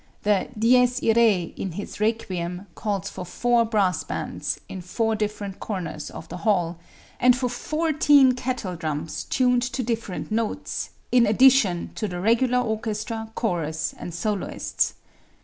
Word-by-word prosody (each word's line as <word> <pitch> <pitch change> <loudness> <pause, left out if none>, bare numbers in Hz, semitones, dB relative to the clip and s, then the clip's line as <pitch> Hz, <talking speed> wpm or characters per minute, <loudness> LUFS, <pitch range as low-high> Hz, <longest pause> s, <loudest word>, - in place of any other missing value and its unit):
The 205 -2 +2
"Dies 245 +2 +4
Irae" 220 -6 +3
in 185 - -4
his 205 +3 -7
"Requiem" 185 -4 -2
calls 200 -3 -2
for - - -6
four 235 +6 +2
brass 195 -7 +1
bands, - - -3
in 190 - -7
four 220 +5 -1
different 205 -2 -3
corners 180 -7 -4
of 160 - -9
the - - -7
hall, 175 -5 0 0.4
and 250 0 +6
for 255 -1 0
fourteen 295 +1 +3
kettledrums 165 - -3
tuned 250 -1 +3
to 255 +1 -2
different 225 -4 -3
notes, 220 0 -2 0.2
in 245 -2 +5
addition 220 -6 +4
to 215 - -3
the 180 -2 -5
regular 240 +5 +3
orchestra, 220 0 -3
chorus 160 -7 -1
and 175 - -7
soloists. 200 +4 -1
215 Hz, 135 wpm, -24 LUFS, 180-240 Hz, 0.4 s, and